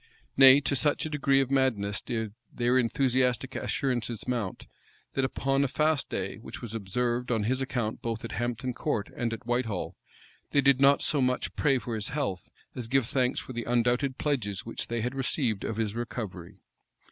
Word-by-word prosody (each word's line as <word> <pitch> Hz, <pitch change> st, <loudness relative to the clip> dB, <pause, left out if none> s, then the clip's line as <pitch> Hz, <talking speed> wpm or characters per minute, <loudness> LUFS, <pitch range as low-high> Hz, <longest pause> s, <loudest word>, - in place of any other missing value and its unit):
(*) -, -, -37 dB
Nay, 135 Hz, 0 st, +9 dB
to 140 Hz, 0 st, +1 dB
such 145 Hz, +2 st, +2 dB
a 155 Hz, -, -4 dB
degree 140 Hz, -2 st, +3 dB
of 135 Hz, 0 st, -2 dB
madness 115 Hz, -7 st, +1 dB
did 110 Hz, -3 st, -3 dB, 0.2 s
their 120 Hz, +1 st, +1 dB
enthusiastic 130 Hz, 0 st, +1 dB
assurances 120 Hz, -5 st, -1 dB
mount, 115 Hz, -7 st, -2 dB, 0.5 s
that, 135 Hz, -, 0 dB
upon 135 Hz, +1 st, +1 dB
a -, -, +2 dB
fast 150 Hz, +2 st, +1 dB
day, -, -, -3 dB
which -, -, -9 dB
was 115 Hz, -2 st, -7 dB
observed 120 Hz, +4 st, -1 dB
on 110 Hz, -3 st, +1 dB
his 130 Hz, +5 st, 0 dB
account 120 Hz, -4 st, -2 dB
both 115 Hz, 0 st, -3 dB
at -, -, -6 dB
Hampton 120 Hz, +1 st, -2 dB
Court 115 Hz, -7 st, -2 dB
and 120 Hz, -1 st, -1 dB
at 115 Hz, +2 st, -6 dB
Whitehall, 120 Hz, -5 st, -1 dB, 0.6 s
they 140 Hz, -, +5 dB
did 135 Hz, -1 st, +4 dB
not 140 Hz, +1 st, +5 dB
so 145 Hz, -, +1 dB
much 125 Hz, 0 st, 0 dB
pray 135 Hz, -3 st, +3 dB
for 120 Hz, -1 st, -5 dB
his 110 Hz, -2 st, -2 dB
health, 125 Hz, -, -3 dB, 0.2 s
as 120 Hz, -3 st, -5 dB
give 135 Hz, 0 st, +2 dB
thanks 125 Hz, +1 st, 0 dB
for 130 Hz, -, -8 dB
the 120 Hz, -1 st, -4 dB
undoubted 120 Hz, +3 st, +1 dB
pledges 110 Hz, -10 st, -1 dB
which 115 Hz, -, -4 dB
they 115 Hz, -1 st, -2 dB
had 125 Hz, +3 st, -2 dB
received 130 Hz, -5 st, 0 dB
of 110 Hz, -, -3 dB
his 110 Hz, -2 st, -1 dB
recovery. 110 Hz, -7 st, -6 dB
125 Hz, 190 wpm, -28 LUFS, 115-135 Hz, 0.6 s, Nay